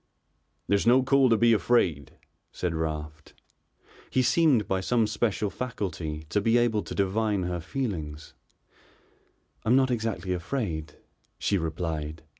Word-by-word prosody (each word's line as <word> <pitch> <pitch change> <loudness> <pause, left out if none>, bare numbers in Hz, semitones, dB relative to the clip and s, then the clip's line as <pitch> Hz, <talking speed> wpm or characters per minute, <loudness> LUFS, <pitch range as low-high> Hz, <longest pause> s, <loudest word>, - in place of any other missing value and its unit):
"There's 100 +2 +1
no 125 +2 +6
call 135 0 +4
to 115 - +4
be 115 +1 +5
afraid," 85 - +1 0.4
said 90 -2 -2
Raft. 75 -1 -5 0.7
He 130 - +2
seemed, 130 -4 +3
by 95 -1 0
some 115 +3 +2
special 105 -1 -1
faculty, 90 -11 -4
to 105 - +1
be 115 +3 +3
able 120 -3 +2
to - - -7
divine 100 0 0
her 90 0 -2
feelings. 80 - -5 1.3
"I'm 115 +3 +3
not 130 -1 +3
exactly 110 -5 -2
afraid," 85 - -3 0.4
she 100 - 0
replied. 80 -1 -4
100 Hz, 130 wpm, -27 LUFS, 80-120 Hz, 1.3 s, no